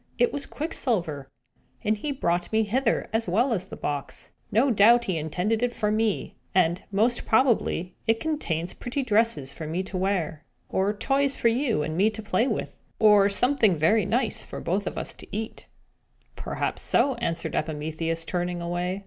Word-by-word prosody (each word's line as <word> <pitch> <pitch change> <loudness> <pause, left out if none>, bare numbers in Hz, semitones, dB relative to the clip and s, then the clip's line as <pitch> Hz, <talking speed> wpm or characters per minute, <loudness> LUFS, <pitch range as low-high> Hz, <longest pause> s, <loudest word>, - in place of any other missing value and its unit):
It 480 -2 +2
was 280 - -4
Quicksilver; 180 - -2 0.5
and 215 +1 +2
he 285 +8 -4
brought 175 -10 -1
me 220 0 +3
hither, 230 +3 0
as 225 -3 0
well 235 +8 +2
as 185 -4 -2
the - - -9
box. 145 -1 -5 0.2
No 250 +6 +3
doubt 235 +3 +5
he 185 - -1
intended 180 +8 -1
it 245 -1 0
for 210 -2 0
me; 215 -1 0 0.2
and, 175 -1 +3
most 225 +5 +2
probably, 220 -7 +2
it 225 0 +3
contains 185 - -2
pretty 260 +3 -3
dresses 215 - +1
for 160 - -7
me 170 +4 -2
to 190 0 -5
wear, 180 -5 -1 0.3
or 195 +2 +1
toys 270 +6 +1
for 235 - +3
you 230 - +1
and 155 +1 -3
me 200 +5 +4
to 220 0 -8
play 215 +4 +1
with, 225 - -3 0.2
or 210 -2 +6
something 235 -2 +3
very 185 +6 +3
nice 235 +1 0
for - - -8
us 200 +3 +1
both - - -4
to - - -12
eat!" 220 +2 -5 0.7
"Perhaps - - -3
so," 275 - +3
answered 165 -8 -2
Epimetheus, 160 +2 -2
turning 175 0 -2
away. 175 +2 -2
205 Hz, 175 wpm, -26 LUFS, 175-235 Hz, 0.7 s, or